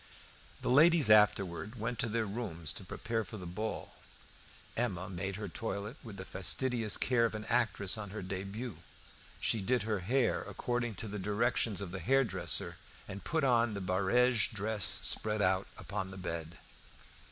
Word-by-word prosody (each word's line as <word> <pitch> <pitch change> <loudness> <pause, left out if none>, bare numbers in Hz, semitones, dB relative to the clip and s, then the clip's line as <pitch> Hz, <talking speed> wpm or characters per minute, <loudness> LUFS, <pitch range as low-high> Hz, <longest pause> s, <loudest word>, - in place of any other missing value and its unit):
The - - -2
ladies 155 -2 +6
afterwards 100 -1 +3
went 115 +1 -3
to 115 - 0
their 115 +1 0
rooms 95 -8 -2
to - - -5
prepare 115 +4 -3
for 110 - -9
the 90 - -8
ball. 105 +6 -4 0.8
Emma 100 -6 -1
made 95 +1 -3
her 105 +1 -5
toilet 105 0 -4
with 110 -5 -9
the 95 - -7
fastidious 115 +4 +1
care 125 -2 +2
of 115 -1 +1
an 110 0 -5
actress 110 -4 +1
on 105 -2 -5
her 105 0 -6
debut. 100 +5 -5 0.6
She 110 - +2
did 120 +3 +1
her 110 -2 -1
hair 120 +7 +1
according 120 -2 -3
to 110 - -5
the 105 0 -5
directions 105 0 0
of 95 -3 -5
the 95 - -5
hairdresser, 135 +7 +1 0.3
and 100 0 -7
put 160 -1 0
on 120 -4 +3
the - - -3
barege 100 +6 +2
dress 105 -2 +1 0.2
spread 110 0 +1
out 95 -1 +2
upon 100 -2 -4
the 95 - -9
bed. 85 -2 -5
105 Hz, 165 wpm, -33 LUFS, 95-120 Hz, 0.8 s, ladies